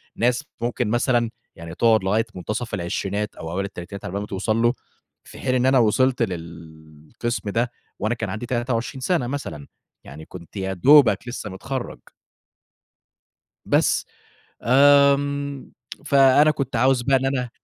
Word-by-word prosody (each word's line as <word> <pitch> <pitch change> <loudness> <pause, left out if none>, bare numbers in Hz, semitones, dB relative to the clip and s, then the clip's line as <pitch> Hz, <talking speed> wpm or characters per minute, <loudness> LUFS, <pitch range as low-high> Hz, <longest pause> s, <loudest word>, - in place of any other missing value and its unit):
ناس 125 +4 +1 0.2
ممكن 120 -1 -1
مثلًا 120 0 +1 0.3
يعني 85 -1 -9
تقعد 110 -2 +3
لغاية 110 +4 +1
مُنتصَف 105 +6 -5
العشرينات 100 +3 -3
أو 80 - -7
أوائِل 95 +3 -2
التلاتينات 100 0 -8
على - - -5
بال 100 - -2
ما 105 - -6
توصل 105 +3 -1
له، 120 +1 +3 0.5
في - - -13
حين 130 -1 0
إن 125 0 +2
أنا 130 0 +4
وصلت 125 +3 +2
للقِسم 80 +5 -6
ده 120 +3 -1 0.3
وأنا 110 +3 -1
كان - - -4
عندي 110 +3 -5
23 120 +1 -2
سَنة 130 -2 0
مثلًا، 85 - -6 0.4
يعني 75 +3 -11
كنت 85 +2 -13
يا 95 0 -2
دوبك 120 - +5
لسّه 120 -4 -5
مِتخرّج. 125 +7 -6 1.7
بس. - - +2 0.6
آمم 140 +1 +3 0.3
فأنا 140 +2 +5
كنت 135 -4 -3
عاوز 130 +1 +3
بقى 135 +2 +3
إن 135 0 0
أنا 130 -3 -1
120 Hz, 145 wpm, -22 LUFS, 95-130 Hz, 1.7 s, دوبك